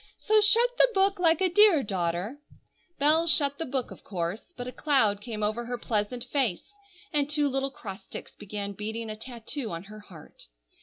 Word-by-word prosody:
So 430 Hz, 0 st, +3 dB
shut 460 Hz, +4 st, +5 dB
the -, -, +6 dB
book, 390 Hz, 0 st, +2 dB
like 330 Hz, -2 st, +3 dB
a 380 Hz, -, +4 dB
dear 360 Hz, -5 st, +5 dB
daughter!" 185 Hz, +6 st, -2 dB, 0.6 s
Bell 310 Hz, +4 st, +4 dB
shut 285 Hz, -3 st, +2 dB
the 325 Hz, -, -3 dB
book, 260 Hz, -1 st, -2 dB
of -, -, -12 dB
course; 185 Hz, -, -4 dB
but 245 Hz, -, -5 dB
a 250 Hz, -, -5 dB
cloud 220 Hz, -9 st, +2 dB
came 215 Hz, -2 st, -4 dB
over 215 Hz, +3 st, -1 dB
her 245 Hz, +1 st, -4 dB
pleasant 235 Hz, +1 st, -2 dB
face, 255 Hz, -, -1 dB, 0.4 s
and 290 Hz, -1 st, +2 dB
two 295 Hz, -1 st, +2 dB
little 270 Hz, 0 st, 0 dB
cross 200 Hz, -6 st, -9 dB
sticks -, -, -9 dB
began 205 Hz, 0 st, -5 dB
beating 220 Hz, +2 st, -4 dB
a -, -, -6 dB
tattoo 235 Hz, +2 st, -6 dB
on 170 Hz, 0 st, -6 dB
her 210 Hz, +2 st, -11 dB
heart. 170 Hz, -, -14 dB
245 Hz, 190 wpm, -27 LUFS, 210-300 Hz, 0.6 s, the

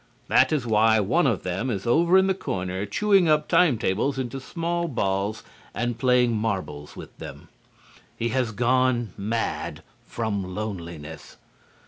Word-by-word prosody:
That -, -, +4 dB
is 145 Hz, -5 st, 0 dB
why 110 Hz, 0 st, +4 dB
one 135 Hz, -, +2 dB
of 115 Hz, -7 st, 0 dB
them 90 Hz, +8 st, -2 dB
is 100 Hz, -5 st, -3 dB
over 170 Hz, +9 st, +4 dB
in 190 Hz, -, +5 dB
the 190 Hz, -, +2 dB
corner 95 Hz, -, -4 dB
chewing 195 Hz, -, +3 dB
up 150 Hz, 0 st, +2 dB
time 160 Hz, -9 st, +4 dB
tables 115 Hz, +6 st, 0 dB
into 130 Hz, 0 st, -4 dB
small 170 Hz, +5 st, -2 dB
balls 100 Hz, -4 st, -1 dB, 0.3 s
and 120 Hz, -1 st, -2 dB
playing 125 Hz, -2 st, +3 dB
marbles 90 Hz, -10 st, -3 dB
with -, -, -11 dB
them. -, -, -10 dB, 0.7 s
He 115 Hz, -, -1 dB
has 125 Hz, -1 st, 0 dB
gone 120 Hz, -1 st, +1 dB
mad 110 Hz, +3 st, -3 dB, 0.2 s
from 100 Hz, -5 st, -3 dB
loneliness. 85 Hz, -7 st, -7 dB
115 Hz, 145 wpm, -25 LUFS, 100-135 Hz, 0.7 s, in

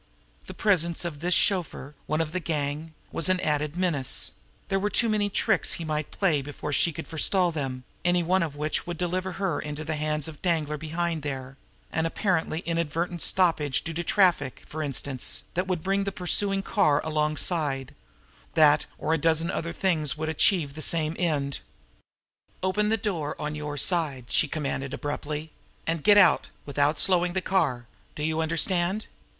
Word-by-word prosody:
The -, -, -8 dB
presence 170 Hz, -5 st, +2 dB
of 160 Hz, -4 st, -4 dB
this 175 Hz, +3 st, +2 dB
chauffeur, 170 Hz, -7 st, +1 dB
one 155 Hz, +1 st, +1 dB
of 155 Hz, -2 st, -2 dB
the 185 Hz, -, -1 dB
gang, 155 Hz, -1 st, -3 dB, 0.2 s
was 165 Hz, -, +2 dB
an 185 Hz, -1 st, +2 dB
added 150 Hz, +1 st, -1 dB
menace; 160 Hz, -8 st, 0 dB, 0.4 s
there 195 Hz, -, +1 dB
were 205 Hz, +2 st, 0 dB
too 230 Hz, +2 st, +3 dB
many 210 Hz, -1 st, +1 dB
tricks -, -, +1 dB
he 170 Hz, -, -5 dB
might 155 Hz, -1 st, -2 dB
play 165 Hz, -8 st, +1 dB
before 145 Hz, +1 st, -5 dB
she 170 Hz, -, +3 dB
could 160 Hz, +1 st, -7 dB
forestall 175 Hz, +3 st, +2 dB
them, 135 Hz, -5 st, -4 dB, 0.2 s
any 175 Hz, 0 st, +3 dB
one 185 Hz, +3 st, +2 dB
of 155 Hz, -4 st, -2 dB
which 150 Hz, +3 st, -2 dB
would 175 Hz, -1 st, -4 dB
deliver 185 Hz, +2 st, -2 dB
her 190 Hz, 0 st, -1 dB
into 150 Hz, +1 st, -5 dB
the 160 Hz, -, -1 dB
hands 150 Hz, 0 st, -1 dB
of 155 Hz, -2 st, -10 dB
Danglar 155 Hz, -4 st, 0 dB
behind 165 Hz, +1 st, -2 dB
there 135 Hz, -2 st, -5 dB, 0.4 s
an 160 Hz, +1 st, 0 dB
apparently 165 Hz, -3 st, 0 dB
inadvertent 170 Hz, +1 st, -2 dB
stoppage 160 Hz, -7 st, +2 dB
due 165 Hz, -, -5 dB
to 175 Hz, +2 st, -2 dB
traffic, 180 Hz, -, +2 dB
for 155 Hz, -, -6 dB
instance, 140 Hz, -2 st, -2 dB
that 180 Hz, +2 st, -1 dB
would 180 Hz, -4 st, -1 dB
bring 195 Hz, +2 st, +1 dB
the 195 Hz, -, -2 dB
pursuing 195 Hz, +2 st, 0 dB
car 150 Hz, -11 st, +3 dB
alongside 150 Hz, -2 st, -1 dB, 0.6 s
that, 150 Hz, -2 st, +5 dB
or 155 Hz, -, 0 dB
a 165 Hz, -, +1 dB
dozen 165 Hz, +2 st, +2 dB
other 170 Hz, 0 st, -3 dB
things 165 Hz, -5 st, +1 dB
which -, -, -9 dB
would 155 Hz, -, -1 dB
achieve 160 Hz, -2 st, +2 dB
the 155 Hz, -, -7 dB
same 160 Hz, 0 st, +1 dB
end. 145 Hz, -6 st, 0 dB, 1.0 s
"Open 210 Hz, +3 st, +1 dB
the 225 Hz, -, +3 dB
door 175 Hz, -9 st, -2 dB
on 150 Hz, 0 st, -3 dB
your 150 Hz, -1 st, -5 dB
side!" 145 Hz, -5 st, +1 dB
she -, -, +3 dB
commanded 140 Hz, -3 st, -3 dB
abruptly. 150 Hz, +1 st, -4 dB, 0.3 s
"And 165 Hz, -1 st, -1 dB
get 205 Hz, -1 st, +7 dB
out 205 Hz, -, +5 dB, 0.2 s
without 145 Hz, +1 st, +1 dB
slowing 180 Hz, -2 st, +3 dB
the 190 Hz, -, +1 dB
car! 135 Hz, -11 st, 0 dB, 0.3 s
Do 150 Hz, -, -4 dB
you 160 Hz, +1 st, 0 dB
understand?" 175 Hz, +5 st, +1 dB
160 Hz, 180 wpm, -27 LUFS, 150-180 Hz, 1.0 s, get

